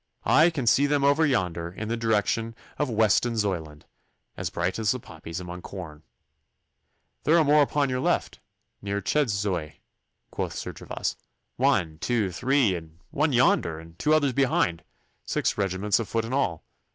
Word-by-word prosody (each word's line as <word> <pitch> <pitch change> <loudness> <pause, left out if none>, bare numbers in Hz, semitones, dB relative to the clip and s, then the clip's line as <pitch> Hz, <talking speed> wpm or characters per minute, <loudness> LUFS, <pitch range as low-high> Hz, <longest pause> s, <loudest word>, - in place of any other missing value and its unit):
'I 160 +3 +6
can 145 -7 -3
see 135 +5 +4
them 145 -1 +1
over 145 +3 +4
yonder 90 - -1
in 105 +4 -6
the 115 - -1
direction 115 0 0 0.2
of 150 -2 0
Westonzoyland, 105 -8 0 0.5
as - - -3
bright 90 +5 -2
as 110 -2 0
the 130 - +1
poppies 80 -4 -8
among 90 0 -7
corn.' 85 -6 -9 1.2
'There 160 +3 +4
are 165 - +5
more 150 +1 +5
upon 145 -1 +1
the 125 0 -1
left, - - 0 0.4
near 100 0 -2
Chedzoy,' 100 - -1 0.6
quoth - - -3
Sir - - -5
Gervas. - - -4 0.4
'One, 80 -2 +1
two, 110 -4 0
three, 125 +1 +2
and 80 -2 -8
one 150 +2 +1
yonder, 100 -10 +2
and 80 +1 -14
two 150 - +1
others 145 -4 +2
behind 120 -10 +1 0.4
six - - -1
regiments 100 +1 0
of 115 - -4
foot 115 -1 -1
in 115 - -5
all. 90 - -1
110 Hz, 160 wpm, -26 LUFS, 90-135 Hz, 1.2 s, I